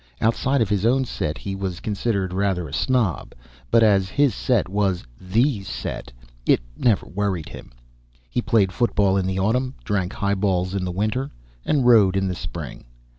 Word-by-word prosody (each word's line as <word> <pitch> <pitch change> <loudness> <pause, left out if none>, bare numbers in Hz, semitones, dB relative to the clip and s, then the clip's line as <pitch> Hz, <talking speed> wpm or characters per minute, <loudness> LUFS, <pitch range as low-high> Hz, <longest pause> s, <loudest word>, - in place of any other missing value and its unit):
Outside 125 +3 +2
of 105 - -4
his 100 -2 0
own 130 +3 +3
set 75 -10 -3
he 100 - -5
was 95 -2 -4
considered 100 -3 -1
rather 95 -3 0
a 70 - -10
snob, 125 -10 0 0.3
but 115 -1 +5
as 100 -3 +3
his 140 +3 +2
set 120 -6 +1
was 95 -2 0 0.2
THE 110 +5 +1
set, 80 - -5 0.3
it - - +4 0.2
never 110 - +2
worried 95 -5 -2
him. - - -11 0.6
He - - -1
played 100 -5 +2
football 100 -4 +2
in 95 -1 +1
the 95 0 -2
autumn, 125 +7 0
drank 95 -4 -1
high 100 -1 0
balls 95 -2 0
in 95 -2 -1
the 90 - -2
winter, 110 +8 -1 0.4
and 140 -5 +2
rowed 105 -6 +6
in 95 0 +1
the 90 - -1
spring. 85 -4 -7
100 Hz, 175 wpm, -23 LUFS, 95-115 Hz, 0.6 s, rowed